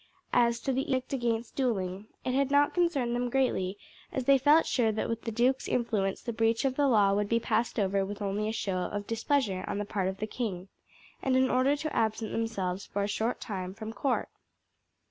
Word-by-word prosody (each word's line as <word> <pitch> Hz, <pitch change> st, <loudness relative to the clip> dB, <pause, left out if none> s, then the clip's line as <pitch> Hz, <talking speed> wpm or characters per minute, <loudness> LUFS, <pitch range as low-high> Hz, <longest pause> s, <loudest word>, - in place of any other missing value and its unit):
As 235 Hz, -1 st, +3 dB
to 270 Hz, -, -1 dB
the 265 Hz, +1 st, -1 dB
edict 255 Hz, +1 st, -1 dB
against 235 Hz, -3 st, -1 dB
duelling, 200 Hz, -6 st, -1 dB, 0.2 s
it 255 Hz, -, 0 dB
had 275 Hz, 0 st, +2 dB
not 285 Hz, +1 st, +4 dB
concerned 290 Hz, -9 st, +1 dB
them 245 Hz, 0 st, -1 dB
greatly, 220 Hz, -7 st, 0 dB, 0.3 s
as 265 Hz, -, -2 dB
they 275 Hz, 0 st, +6 dB
felt 300 Hz, +4 st, +5 dB
sure 230 Hz, -4 st, +2 dB
that 215 Hz, -, -2 dB
with 230 Hz, 0 st, -4 dB
the 230 Hz, -, -2 dB
duke's 250 Hz, +4 st, +1 dB
influence 210 Hz, -5 st, 0 dB
the 235 Hz, -, -3 dB
breach 225 Hz, +2 st, +1 dB
of 260 Hz, -1 st, +1 dB
the 285 Hz, 0 st, +3 dB
law 205 Hz, -6 st, +4 dB
would 205 Hz, 0 st, 0 dB
be 230 Hz, -, +3 dB
passed 230 Hz, +1 st, 0 dB
over 195 Hz, -1 st, +1 dB
with 205 Hz, +2 st, -5 dB
only 205 Hz, +1 st, -1 dB
a -, -, -1 dB
show 200 Hz, -4 st, -2 dB
of 205 Hz, +3 st, -3 dB
displeasure 225 Hz, -4 st, 0 dB
on -, -, -2 dB
the 205 Hz, -, -2 dB
part 195 Hz, -2 st, -1 dB
of 190 Hz, 0 st, -3 dB
the 215 Hz, -, -2 dB
king, 200 Hz, -5 st, -4 dB, 0.5 s
and 260 Hz, -1 st, +1 dB
an 260 Hz, 0 st, +3 dB
order 260 Hz, +3 st, +3 dB
to 310 Hz, +1 st, -4 dB
absent 220 Hz, 0 st, 0 dB
themselves 200 Hz, -5 st, -2 dB
for 200 Hz, -, -2 dB
a -, -, 0 dB
short 220 Hz, +3 st, -1 dB
time 190 Hz, -3 st, -5 dB
from 220 Hz, +2 st, -6 dB
court. 265 Hz, +2 st, -1 dB
230 Hz, 215 wpm, -29 LUFS, 200-260 Hz, 0.5 s, they